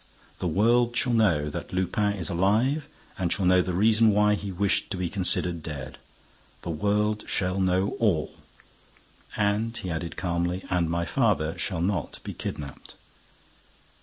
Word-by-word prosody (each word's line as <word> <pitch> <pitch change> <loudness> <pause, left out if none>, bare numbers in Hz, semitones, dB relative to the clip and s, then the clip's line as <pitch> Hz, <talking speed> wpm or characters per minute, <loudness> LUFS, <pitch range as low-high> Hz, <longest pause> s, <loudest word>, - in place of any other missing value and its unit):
The 90 - -1
world 120 +7 +2
shall 125 -1 +1
know 85 -10 +3
that - - -6
Lupin 100 +3 0
is 95 -3 -2
alive 110 - +1 0.3
and 90 -3 0
shall 95 - 0
know 90 0 +5
the 90 - -2
reason 110 +3 +4
why 105 0 +4
he 100 -1 -3
wished 95 +2 +1
to - - -3
be 90 -2 -2
considered 90 -3 0
dead. 70 -4 -7 0.6
The 85 - -3
world 105 +5 0
shall 90 0 -1
know 95 +1 +2
all." 95 -9 +1 1.0
And 105 +3 0
he 90 - -4
added, 85 +1 -4
calmly, 85 0 -1
"And 90 -2 +1
my 85 +1 -1
father 95 - +1
shall 90 -5 -2
not 90 -3 -1
be - - -6
kidnapped." 70 -3 -7
95 Hz, 155 wpm, -26 LUFS, 85-105 Hz, 1.0 s, know